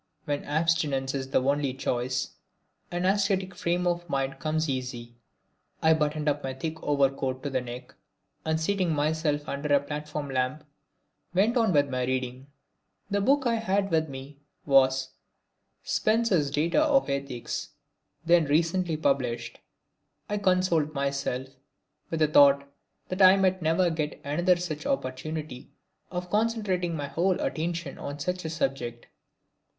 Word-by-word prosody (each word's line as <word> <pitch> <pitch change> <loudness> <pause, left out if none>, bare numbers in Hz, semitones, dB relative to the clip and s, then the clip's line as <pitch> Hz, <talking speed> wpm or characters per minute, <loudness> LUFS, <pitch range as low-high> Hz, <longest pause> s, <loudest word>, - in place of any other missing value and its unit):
When 145 -2 -2
abstinence 150 -4 +1
is 135 -1 -3
the 130 - +2
only 140 -1 +1
choice, 130 -1 -1 0.6
an 175 +1 -2
ascetic 195 -1 +1
frame 175 +1 -1
of 175 -1 -1
mind 135 -2 -1
comes 155 +1 0
easy. 125 -3 -4 0.7
I 160 0 +5
buttoned 150 -1 -1
up 145 0 +1
my 130 -1 -3
thick 160 +4 -5
overcoat 135 -2 0
to 145 - -3
the 130 -1 0
neck 125 0 -8 0.5
and 160 0 0
seating 180 0 +1
myself 150 0 0
under 145 +1 -3
a 145 - +6
platform 150 0 -5
lamp 130 +3 -1 0.7
went 210 +6 +3
on 230 -5 +3
with 145 -4 +3
my 125 -1 -1
reading. 130 +1 -3 0.6
The 200 0 +1
book 270 +5 +3
I 235 -1 +2
had 200 -2 0
with 160 -1 +1
me 135 +1 -9 0.3
was 135 -1 +4 0.7
Spencer's 215 -9 +2
Data 160 - +2
of 290 -3 +3
Ethics, 140 -3 -3 0.6
then 170 -1 +5
recently 165 +3 +1
published. 125 -6 -1 0.7
I 205 0 -1
consoled 185 -5 +2
myself 140 -2 -2 0.6
with 165 -1 -2
the 155 - +5
thought 140 -1 +6 0.4
that 185 +2 -2
I 190 +1 +8
might 185 -1 +2
never 165 +2 +2
get 155 -2 -3
another 175 +6 +2
such 175 - -4
opportunity 155 - -4 0.4
of 180 -1 -5
concentrating 205 -6 0
my 145 -2 -3
whole 175 +6 0
attention 165 -2 -3
on 145 0 -5
such 180 +4 -3
a - - -2
subject. 135 -7 -3
155 Hz, 145 wpm, -27 LUFS, 135-180 Hz, 0.7 s, I